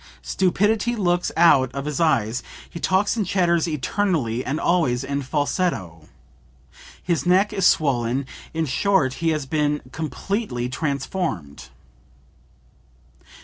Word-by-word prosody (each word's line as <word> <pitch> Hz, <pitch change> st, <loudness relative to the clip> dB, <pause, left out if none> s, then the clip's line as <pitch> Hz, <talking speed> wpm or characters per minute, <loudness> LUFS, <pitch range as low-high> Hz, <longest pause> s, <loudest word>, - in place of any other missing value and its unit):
Stupidity 210 Hz, +5 st, +1 dB
looks 175 Hz, -4 st, 0 dB
out 135 Hz, -7 st, +5 dB
of 140 Hz, 0 st, -4 dB
his 150 Hz, -2 st, -3 dB
eyes, 125 Hz, -7 st, +1 dB, 0.3 s
he 170 Hz, -, -9 dB
talks 190 Hz, +5 st, +1 dB
and 220 Hz, -, 0 dB
chatters 175 Hz, -3 st, +1 dB
eternally 150 Hz, -, -1 dB
and 145 Hz, +4 st, -2 dB
always 140 Hz, -9 st, +1 dB
in 140 Hz, +1 st, -2 dB
falsetto. 135 Hz, -, -2 dB, 0.9 s
His 170 Hz, -4 st, -1 dB
neck 195 Hz, +4 st, +3 dB
is 195 Hz, -3 st, +3 dB
swollen, 130 Hz, -2 st, +1 dB, 0.3 s
in 160 Hz, 0 st, -1 dB
short 155 Hz, -1 st, +1 dB
he 165 Hz, -, +2 dB
has 155 Hz, -3 st, -1 dB
been 150 Hz, +1 st, 0 dB
completely 155 Hz, -, -3 dB
transformed." 140 Hz, -, -3 dB
155 Hz, 115 wpm, -23 LUFS, 130-180 Hz, 0.9 s, out